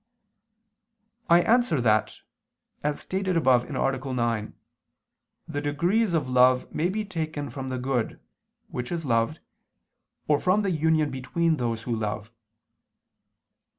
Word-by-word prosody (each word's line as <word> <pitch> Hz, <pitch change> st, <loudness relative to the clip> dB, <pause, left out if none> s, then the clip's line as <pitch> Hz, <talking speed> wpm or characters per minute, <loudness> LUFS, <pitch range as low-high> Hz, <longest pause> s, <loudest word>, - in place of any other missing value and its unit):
I 170 Hz, +1 st, +6 dB
answer 240 Hz, -, +3 dB
that, 110 Hz, -3 st, +1 dB, 0.6 s
As 150 Hz, 0 st, -1 dB
stated 190 Hz, -2 st, -1 dB
above 125 Hz, -6 st, +3 dB
(A. 135 Hz, -1 st, -1 dB
9), 115 Hz, -3 st, -1 dB, 0.9 s
the 145 Hz, -, -3 dB
degrees 175 Hz, +8 st, +1 dB
of 155 Hz, -5 st, 0 dB
love 125 Hz, 0 st, +3 dB
may 170 Hz, +3 st, 0 dB
be 215 Hz, +2 st, -2 dB
taken 155 Hz, -, -4 dB
from 130 Hz, +1 st, -5 dB
the 130 Hz, -, -3 dB
good 125 Hz, -2 st, -2 dB, 0.5 s
(which 125 Hz, 0 st, -5 dB
is 170 Hz, -2 st, -3 dB
loved), 115 Hz, +5 st, 0 dB, 0.9 s
or 150 Hz, -1 st, +3 dB
from 190 Hz, +3 st, +2 dB
the 195 Hz, -, 0 dB
union 155 Hz, -2 st, +2 dB
between 160 Hz, +5 st, 0 dB
those 115 Hz, -3 st, -2 dB
who 120 Hz, -, -2 dB
love. 105 Hz, 0 st, -4 dB
145 Hz, 125 wpm, -26 LUFS, 125-170 Hz, 0.9 s, I